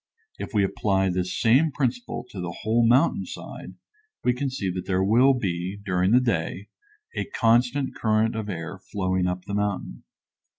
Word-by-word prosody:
If - - -6
we 100 - +4
apply 95 -1 +1
this 90 0 -2
same 130 +8 +4
principle 125 -3 -2
to 95 - -6
the 90 -1 -4
whole 115 +2 +2
mountain 130 +8 +3
side - - -9 0.5
we 125 - +3
can 135 +2 -2
see 100 -8 -2
that 90 0 -5
there 95 -1 +1
will 125 +7 +5
be, 95 -4 -3
during 95 -2 0
the 120 +4 +6
day, 100 -4 -2 0.5
a - - -1
constant 125 - +2
current 110 0 +1
of 110 -2 -4
air 90 +1 -5
flowing 95 -2 -1
up 90 0 -3
the 100 - -6
mountain. 100 -11 -2
105 Hz, 170 wpm, -25 LUFS, 95-120 Hz, 0.5 s, the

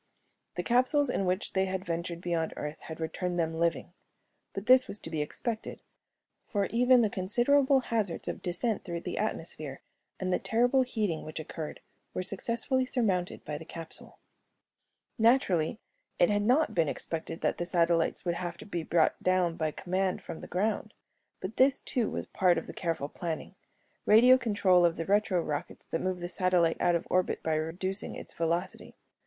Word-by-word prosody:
The - - -2
capsules 255 +3 +3
in 195 - 0
which 185 +2 -1
they 190 0 +2
had 190 0 -3
ventured 170 0 -3
beyond 170 -2 -1
Earth 150 +1 -5
had 160 0 -8
returned 175 +2 -2
them 165 -1 0
living. 170 0 0 0.6
But 195 - -6
this 255 +1 +6
was - - -3
to 165 - -8
be 155 -2 -1
expected, 220 +9 -4 0.7
for 200 -2 0
even 245 +1 +5
the - - +4
considerable 260 +8 +3
hazards 220 -8 -2
of - - -4
descent 195 +5 -1
through 170 -2 -4
the - - -4
atmosphere 155 -9 -3 0.4
and 185 -1 -1
the - - +2
terrible 245 +4 +2
heating 215 -10 -1
which 155 +1 -6
occurred 155 0 -6 0.3
were 185 - -1
successfully 235 +7 0
surmounted 205 -9 -1
by 150 -1 -4
the - - -8
capsule. 165 0 -6 1.0
Naturally, 215 -8 +3 0.4
it 175 - +4
had 205 0 +2
not 255 +9 +3
been 165 -4 +2
expected 165 0 -4
that - - 0
the 175 - -1
satellites 170 0 +1
would 175 - +1
have 170 0 -4
to - - -10
be 175 -5 -3
brought 160 0 +2
down 185 -2 +2
by 155 -1 0
command 185 +4 -2
from 160 - -7
the - - -8
ground. 210 +3 -1 0.5
But 190 +4 -6
this, 265 +1 +5
too, 240 -5 -1
was - - -4
part 180 -3 +2
of - - -3
the - - -8
careful 165 -5 -2
planning 165 +1 -5 0.5
radio 250 +4 +7
control 205 -6 +3
of 170 -1 +3
the 165 - -4
retro 200 -3 +2
rockets 145 -1 -5
that 165 - -3
move 185 -1 -2
the 175 - -3
satellite 180 -2 +2
out 175 - +3
of 170 - -1
orbit 185 0 0
by 160 - 0
reducing 175 +6 -3
its - - -9
velocity. 170 +3 -2
185 Hz, 180 wpm, -30 LUFS, 165-220 Hz, 1.0 s, radio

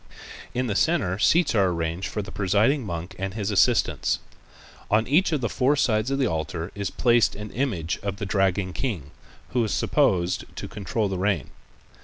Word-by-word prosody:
In 125 +1 0
the 110 - -1
center 105 - +1
seats 165 +9 +3
are 100 -4 +3
arranged 85 +2 -2
for 105 - -3
the - - -9
presiding 105 +8 +2
monk 85 -1 -5
and 95 +1 -3
his 105 -1 -2
assistants. 100 - +2 0.7
On 110 +2 +3
each 170 +8 +3
of 150 -4 0
the 115 - +1
four 130 +5 +2
sides 115 -4 +1
of 135 - 0
the 135 - +2
altar 80 -1 -3
is 100 -2 -3
placed 120 +1 +3
an 105 0 -7
image 95 - -2
of 100 -1 -3
the 100 - -5
Dragon 95 -1 +1
King 90 - -3 0.4
who 120 -1 +1
is 110 - -2
supposed 90 -1 +1
to - - -5
control 105 +1 -2
the 95 -2 -3
rain. 95 -7 0
100 Hz, 185 wpm, -25 LUFS, 95-120 Hz, 0.7 s, seats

